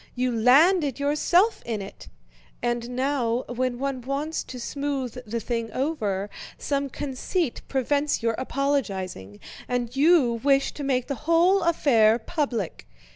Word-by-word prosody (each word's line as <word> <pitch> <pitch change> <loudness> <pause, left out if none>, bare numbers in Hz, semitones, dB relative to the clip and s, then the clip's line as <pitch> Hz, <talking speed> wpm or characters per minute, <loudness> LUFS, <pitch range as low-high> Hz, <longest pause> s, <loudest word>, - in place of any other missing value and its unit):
You 250 0 0
landed 280 - +4
yourself 345 +9 +2
in 225 -3 -3
it. 195 0 -9 0.6
And 240 0 -1
now, 250 -2 0
when 245 0 -2
one 270 0 -3
wants 280 +5 -3
to 255 - -8
smooth 275 -1 -3
the 230 +2 -2
thing 230 0 -3
over, 215 -9 -1 0.3
some 280 -1 -2
conceit 285 +3 -3
prevents 280 +1 0
your 230 -1 +2
apologizing, 195 - -2 0.3
and 245 0 -2
you 275 -6 +4
wish 275 -1 +3
to 290 - -7
make 255 -3 0
the 290 +3 -6
whole 355 +4 +5
affair 240 -10 +4
public. 240 - -3
260 Hz, 130 wpm, -25 LUFS, 235-290 Hz, 0.6 s, whole